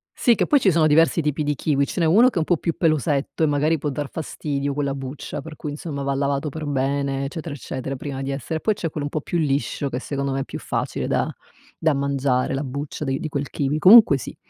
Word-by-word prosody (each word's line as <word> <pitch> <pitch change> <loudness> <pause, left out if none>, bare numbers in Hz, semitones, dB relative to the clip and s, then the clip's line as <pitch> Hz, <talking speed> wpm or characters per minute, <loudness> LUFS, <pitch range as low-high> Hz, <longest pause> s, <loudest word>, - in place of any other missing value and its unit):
Sì, 240 - +4
che - - 0
poi 290 - +4
ci 200 - +4
sono 160 -2 +3
diversi 165 +2 +4
tipi 150 0 -1
di 145 0 0
kiwi. 140 0 +1
Ce - - -5
n'è 165 - +3
1 220 +10 +6
che 225 - -5
è - - +3
un 160 - +1
po' 175 0 +1
più 165 +1 -2
pelosetto 155 -2 0
e - - +5
magari 150 +2 +1
può 150 - -3
dar 145 0 -3
fastidio 145 -3 -3
quella 140 -1 -1
buccia, 135 +2 -6
per 155 +1 -10
cui 150 - -5
insomma 145 -1 -5
va 140 0 -1
lavato 140 +2 -1
per 155 +2 -6
bene, 140 0 -1
eccetera 155 +1 -5
eccetera, 135 -1 -5
prima 135 0 -5
di 135 - -3
essere 140 +4 -3
e - - -13
poi 215 - +2
c'è 165 -4 -3
quello 145 -1 -4
un - - -4
po' 155 - -3
più 175 - -2
liscio 140 -1 0
che 125 - -3
secondo 140 0 -3
me 135 - -1
è - - -2
più - - -7
facile - - -3
da - - 0 0.5
da 160 -2 +2
mangiare 135 -2 0
la 135 - -1
buccia 140 +3 -5
di 135 -1 -1
di 155 - -4
quel 140 -1 -3
kiwi. 145 +1 -1
Comunque 195 -2 +8
sì. - - -8
145 Hz, 255 wpm, -23 LUFS, 140-160 Hz, 0.5 s, Comunque